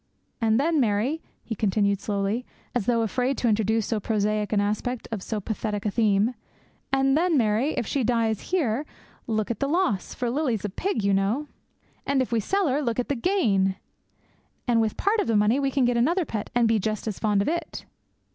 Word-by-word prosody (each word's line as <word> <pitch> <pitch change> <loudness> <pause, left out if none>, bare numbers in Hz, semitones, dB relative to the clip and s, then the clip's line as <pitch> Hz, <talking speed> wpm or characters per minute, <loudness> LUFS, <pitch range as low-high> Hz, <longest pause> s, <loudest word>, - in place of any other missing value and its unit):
And 225 +1 +3
then, 315 +2 +2
Mary,' 240 +7 +1 0.2
he 230 - -4
continued 200 -1 +1
slowly, 205 +3 -1 0.3
as 235 -5 -1
though 230 -2 +3
afraid 250 +4 0
to 245 - 0
introduce 220 0 +2
so 225 - -1
prosaic 210 0 0
an 210 - +2
aspect 215 +4 -2
of 215 -4 -3
so 215 +2 -3
pathetic 210 0 -3
a 210 - +1
theme, 215 +1 +2 0.6
'and 270 0 +3
then, 335 0 +3
Mary, 230 +5 +2
if - - -1
she 270 +5 -1
dies 225 -2 +1
here, 285 -8 +1 0.4
look 220 -1 0
at 230 - -4
the 275 - 0
loss, 285 - 0
for 245 -2 -1
Lily's 250 -7 -1
a - - -1
pig, 235 - -2
you 200 0 +2
know! 210 +10 0 0.5
And 280 -1 +1
if 260 - -1
we 230 - +2
sell 390 - +1
her, 280 +2 +1
look 235 -5 -1
at 245 - -2
the 285 - +1
gain! 215 - +2 0.9
And 235 -2 +3
with 220 -2 -1
part 420 +3 +1
of 415 - 0
the 225 - +2
money 210 +6 +3
we 275 -1 +1
can 270 -1 +2
get 240 0 +2
another 335 +9 +2
pet, 215 -6 -4
and 240 -1 +4
be 225 -1 +3
just 215 +2 -2
as 210 - -3
fond 205 -2 +2
of - - -5
it.' 340 +2 -3
230 Hz, 210 wpm, -25 LUFS, 210-270 Hz, 0.9 s, and